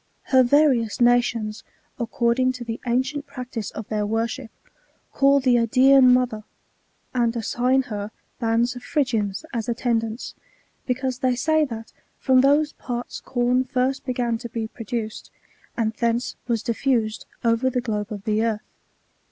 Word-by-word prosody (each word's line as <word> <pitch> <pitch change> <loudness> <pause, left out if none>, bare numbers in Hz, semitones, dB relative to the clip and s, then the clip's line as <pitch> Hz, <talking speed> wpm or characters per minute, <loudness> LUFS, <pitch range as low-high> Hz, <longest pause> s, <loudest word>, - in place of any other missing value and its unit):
Her 260 - +8
various 255 -4 +3
nations, 240 -3 +2 0.4
according 235 +2 +1
to 250 -1 -7
the 230 -1 -5
ancient 260 +4 -1
practice 250 -5 -6
of 215 - -8
their 215 -1 0
worship, 225 +4 -2 0.6
call 280 0 +4
the 255 -2 +3
Idsean 255 +2 +6
mother, 250 -4 +1 0.7
and 240 -2 +1
assign 250 +3 +1
her 210 -4 -5 0.3
bands 235 +2 +1
of 245 - -8
Phrygians 235 - -1
as 230 0 -2
attendants, 230 -1 -1 0.5
because 255 0 -1
they 255 -2 +1
say 315 +4 +2
that 225 -4 -8 0.2
from 260 -1 +4
those 290 +3 +3
parts 245 -1 -5
com 250 0 +1
first 260 +1 -1
began 240 -3 -1
to 235 0 -7
be 225 -1 -3
produced, 225 0 -5 0.5
and 225 -2 0
thence 235 +2 -1
was 230 -3 0
diffused 235 -2 0 0.2
over 230 +3 +3
the 250 - -1
globe 210 -3 -3
of 205 -2 -6
the 215 +1 +1
earth. 220 -2 -1
240 Hz, 145 wpm, -23 LUFS, 225-255 Hz, 0.7 s, Her